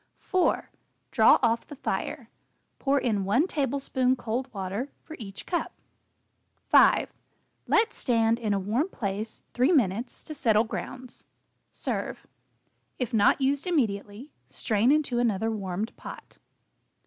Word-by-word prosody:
4. 370 -2 0 0.4
Draw - - +6
off 230 -1 +1
the 290 - -9
fire. 280 - -3 0.5
Pour 280 0 +2
in 215 -6 0
1 225 - +3
tablespoon 270 -4 0
cold 245 +2 -3
water 200 +6 -4
for 315 - -9
each 195 -4 -8
cup. 345 - -2 1.0
5. - - +5 0.5
Let 445 0 +3
stand 230 -1 +1
in 220 -3 -1
a 200 - +2
warm 230 - 0
place 210 - -4
3 255 +7 +3
minutes 235 - 0
to 310 - -7
settle 225 -6 +3
grounds. 255 +2 -7 0.4
Serve. - - -4 0.7
If 250 -3 -3
not 220 +5 +4
used 275 +5 +1
immediately, 225 - -1 0.2
strain 220 +3 +1
into 285 -5 +1
another 225 -2 +1
warmed 200 0 -4
pot. - - -11
240 Hz, 125 wpm, -27 LUFS, 210-275 Hz, 1.0 s, Draw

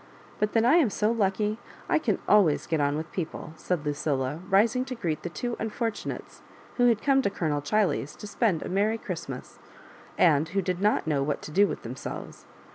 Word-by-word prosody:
But 210 0 0
then 225 0 +3
I 280 +8 +6
am 300 -10 +4
so 210 +2 +1
lucky, 210 0 0 0.3
I - - +3
can 220 -10 0
aiways 200 -8 +4
get 160 -2 +1
on 145 +1 +1
with 155 +1 -5
people," 160 -3 -5
said 160 -1 -2
Lucilla, 145 -1 -1
rising 220 +6 +3
to 260 - -5
greet 170 -9 -2
the 175 - -4
two 240 +7 -3
unfortunates 225 0 -4 0.4
who 245 -1 +5
had 225 -3 +2
come 270 -1 +4
to 225 - +1
Colonel 155 -6 -1
Chiley's 180 -3 0
to - - -10
spend 205 -5 0
a - - -5
merry 205 +4 +1
Christmas, 165 - -7 0.6
and 160 -2 +4
who 195 +4 0
did 180 0 -2
not 210 +1 +2
know 150 -3 +1
what 140 +1 -2
to - - -7
do 200 +6 +4
with - - -5
themselves. 125 +3 -7
195 Hz, 200 wpm, -27 LUFS, 155-220 Hz, 0.6 s, I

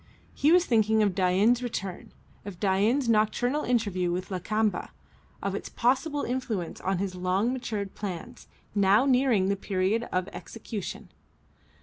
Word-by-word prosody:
He 295 - +3
was 360 +1 +5
thinking 220 -2 +3
of 200 -3 +2
Dain's 195 +6 +3
return, 195 -7 -5 0.3
of 195 -4 -8
Dain's 210 +7 +2
nocturnal 230 +6 +2
interview 200 -8 0
with 180 +2 -4
Lakamba, 215 +3 -1 0.5
of - - -1
its - - -5
possible 270 +5 0
influence 230 -8 -3
on 190 0 0
his 190 0 -2
long 185 +6 0
matured 210 -6 -4
plans, 190 -5 -7 0.3
now 200 +4 +4
nearing 250 -8 +3
the 200 - +2
period 200 +4 -1
of 185 0 0
their 205 - -13
execution. 215 -3 -7
210 Hz, 140 wpm, -27 LUFS, 190-240 Hz, 0.5 s, was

